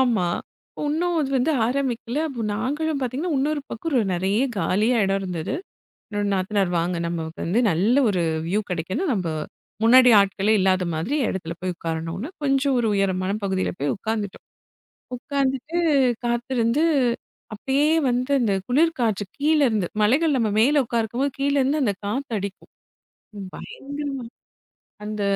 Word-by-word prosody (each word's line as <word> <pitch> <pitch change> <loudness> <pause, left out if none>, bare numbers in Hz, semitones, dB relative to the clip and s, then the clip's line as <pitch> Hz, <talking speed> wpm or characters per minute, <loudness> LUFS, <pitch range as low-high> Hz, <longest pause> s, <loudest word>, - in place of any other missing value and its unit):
ஆமா, 230 -9 +2 0.6
ஒண்ணும் 335 +4 0
அது 275 -2 -1
வந்து 260 +5 +2
ஆரம்பிக்கல. 255 0 -2
அப்போ, 240 -5 -5
நாங்களும் 295 +6 -1
பாத்தீங்கன்னா 270 +7 -2
இன்னொரு 295 +2 0
பக்கம் 320 +7 -4
ரொ 250 - +4
நிறைய 195 +6 0 0.2
காலியா 215 +6 +2
இடம் 195 0 0
இருந்தது. 180 - -3 0.6
என்னோட, 205 -1 -2
நாத்தனார் 190 -1 0
வாங்க 175 +1 -1
நமக்கு 165 -1 -4
வந்து 195 +8 +1
நல்ல 200 +10 +2
ஒரு 180 -4 0 0.2
வ்யூ 200 +5 +1
கிடைக்கணும், 190 - -1
நம்ம 185 -5 -2 0.6
முன்னாடி 250 +2 +7
ஆட்களே 200 +2 +2
இல்லாத 185 -1 +2
மாதிரி 195 - -1
இடத்துல 170 -3 -4
போய் 185 -1 -2
உக்காரணும்ன்னு, 165 - -4
கொஞ்சம் 275 -1 +2
ஒரு 230 - +1
உயரமான 190 -1 0
பகுதியில 190 -1 0
போய் 140 0 0
உக்காந்துட்டோம். 210 -1 -4 0.7
உக்காந்துட்டு 275 +4 -2 0.5
காத்து 240 +2 -1
இருந்து 230 +6 +2 0.7
அப்படியே 270 +7 0 0.2
வந்து 250 +3 -1
அந்தக் 195 -5 0
குளிர் 320 +5 +3
காற்று 215 -4 +1
கீழ 300 +2 +3
இருந்து, 205 -6 0
மலைகள் 280 +8 +3
நம்ம 225 -3 +1
மேல 285 +5 +4
உக்காந்துருக்கும்போது 235 +4 -1
கீழ 280 +1 +1
இருந்து 280 +4 +1
அந்தக் 205 -5 -1
காற்று 250 +3 -3
அடிக்கும். 200 0 -7 0.8
பயங்கரமா, 280 -1 -6 0.8
அந்த 210 0 -4
230 Hz, 140 wpm, -23 LUFS, 195-275 Hz, 0.8 s, முன்னாடி